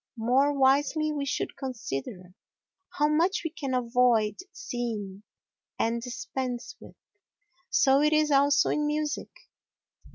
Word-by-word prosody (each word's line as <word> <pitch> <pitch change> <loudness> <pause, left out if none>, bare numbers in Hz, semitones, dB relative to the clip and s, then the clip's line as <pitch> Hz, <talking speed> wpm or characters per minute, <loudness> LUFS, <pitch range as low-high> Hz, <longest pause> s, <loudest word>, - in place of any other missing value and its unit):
More 255 +5 +2
wisely 290 +3 +2
we 285 -2 -3
should 290 - -3
consider 205 - -6 0.6
how 295 - +3
much 330 +6 +1
we 325 - -3
can 275 -5 -3
avoid 235 -3 +2
seeing 235 - -5 0.6
and 230 +1 0
dispense 255 0 -5
with. - - -14 0.7
So 270 0 +4
it 300 +1 +3
is 305 -1 +2
also 280 0 +4
in 300 0 0
music. 300 -1 -2
265 Hz, 120 wpm, -27 LUFS, 235-295 Hz, 0.7 s, So